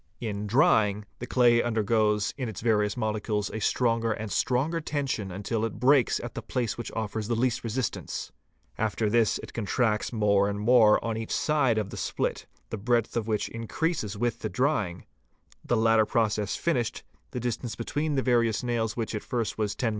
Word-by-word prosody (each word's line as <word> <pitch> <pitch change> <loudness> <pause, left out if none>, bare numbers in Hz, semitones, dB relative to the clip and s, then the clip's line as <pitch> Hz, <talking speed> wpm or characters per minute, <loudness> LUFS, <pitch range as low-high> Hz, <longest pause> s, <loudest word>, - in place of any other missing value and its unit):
In 105 -3 -3
drying, 105 -4 +3
the 125 - -6
clay 120 -2 +4
undergoes 110 -2 +1
in 130 -4 -3
its 105 - -7
various 105 -3 +1
molecules 105 -2 -1
a 110 - -3
stronger 115 0 +1
and 110 -1 -6
stronger 145 +7 0
tension 135 -10 -2
until 105 +4 -2
it 115 -3 -3
breaks 135 -1 +4
at - - -6
the - - -5
place 120 -3 -2
which 120 - -6
offers 110 -1 -3
the 120 - 0
least 120 0 0
resistance; 115 +1 -3 0.5
after 110 0 0
this 115 -2 +3
it - - -10
contracts 110 0 0
more 100 -3 +3
and 100 0 -3
more 110 -1 +6
on 115 -1 -1
each 115 0 -5
side 145 -7 +2
of 105 -2 -2
the - - -7
split, - - -2 0.2
the 110 - -3
breadth 115 +1 +1
of 115 -2 -1
which 110 -2 0
increases 115 - -2
with 120 +2 -1
the - - -3
drying: 115 - -1 0.6
The 120 - +1
latter 110 -1 +4
process 105 -3 0
finished, 125 -10 -1 0.3
the 125 - -4
distance 120 -1 -3
between 145 +6 -2
the 135 - +1
various 115 -4 +2
nails 115 -2 -1
which 115 -1 -2
at 105 - -3
first 115 -4 -3
was 105 -2 -1
10mm. 120 - 0
115 Hz, 185 wpm, -27 LUFS, 105-120 Hz, 0.6 s, more